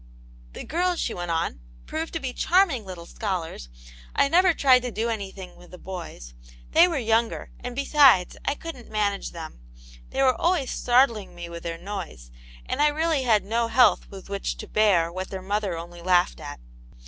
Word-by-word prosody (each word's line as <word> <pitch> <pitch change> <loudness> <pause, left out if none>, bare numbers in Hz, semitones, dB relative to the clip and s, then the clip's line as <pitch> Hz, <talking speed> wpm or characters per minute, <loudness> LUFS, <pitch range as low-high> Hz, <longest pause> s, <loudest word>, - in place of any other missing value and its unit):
" - - -23
The - - -7
girls," 355 +2 0
she 230 - -1
went 175 -1 -5
on, 165 - -1
" - - -23
proved 320 +1 -4
to 325 - -2
be 260 -4 -4
charming 335 - +2
little 180 -3 -8
scholars; 170 - -4 0.5
I 280 - +3
never 360 +3 +5
tyied 260 -5 +4
to 250 - -3
do 225 +2 -2
anything 195 -4 -6
with 175 - -16
the 180 - -11
boys; 170 - -8 0.4
they 335 +2 +7
were 335 -4 -2
younger, 230 -2 0
and, 245 0 -6
besides, 275 -8 +5
I 280 - 0
couldn't 290 -7 -9
manage 205 -2 -1
them; 160 - -9 0.5
they 270 - 0
were 260 -1 +5
always 335 -5 0
startling 240 -5 +2
me 175 0 -7
with 170 0 -8
their 165 -1 -4
noise, 175 - -7 0.3
and 290 - -2
I 300 - +6
really 310 0 +1
had 225 -6 +2
no 230 +3 0
health 230 -1 +4
with 195 -1 -11
which 200 0 -3
to - - -8
bear 185 -6 +3
what 185 +1 -5
their 190 - -5
mother 200 -2 -1
only 170 +1 -9
laughed 180 0 +2
at. - - -8
215 Hz, 195 wpm, -25 LUFS, 175-270 Hz, 0.5 s, they